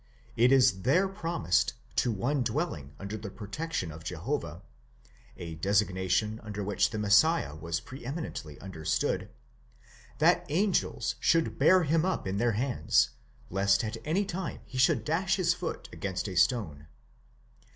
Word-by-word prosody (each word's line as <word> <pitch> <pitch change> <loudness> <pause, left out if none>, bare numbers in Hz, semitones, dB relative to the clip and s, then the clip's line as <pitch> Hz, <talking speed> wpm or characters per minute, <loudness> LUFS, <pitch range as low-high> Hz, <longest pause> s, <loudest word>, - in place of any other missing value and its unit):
It 120 +3 +4
is 125 -8 +4
there 180 - +3
promised 165 - 0 0.2
to 120 +11 +2
one 125 +7 0
dwelling 115 - -3
under 100 +2 -5
the 105 -1 -7
protection 105 - -4
of 80 +1 -10
Jehovah 90 - -4 0.7
(a 85 -2 -7
designa 95 +1 +1
tion 110 +2 +1
under 105 -2 -5
which 105 +1 +1
the 110 - -5
Messiah 105 - +3
was 85 +1 -3
pre 130 0 -11
eminently 125 - -6
understood), 80 -5 -2 0.9
that - - +4
angels 185 +5 +1
should 165 0 +2
bear 185 -1 +6
him 160 +1 +2
up 190 +1 -1
in 95 +1 -2
their 120 +1 +2
hands, 120 - +2 0.4
lest 95 +1 +2
at 110 0 -3
any 180 +7 0
time 185 -3 -5
he 130 - -6
should 130 - +3
dash 185 +5 +1
his 180 -3 +2
foot - - -5
against 95 0 -3
a 95 - -5
stone. 85 - +1
110 Hz, 150 wpm, -29 LUFS, 95-155 Hz, 0.9 s, bear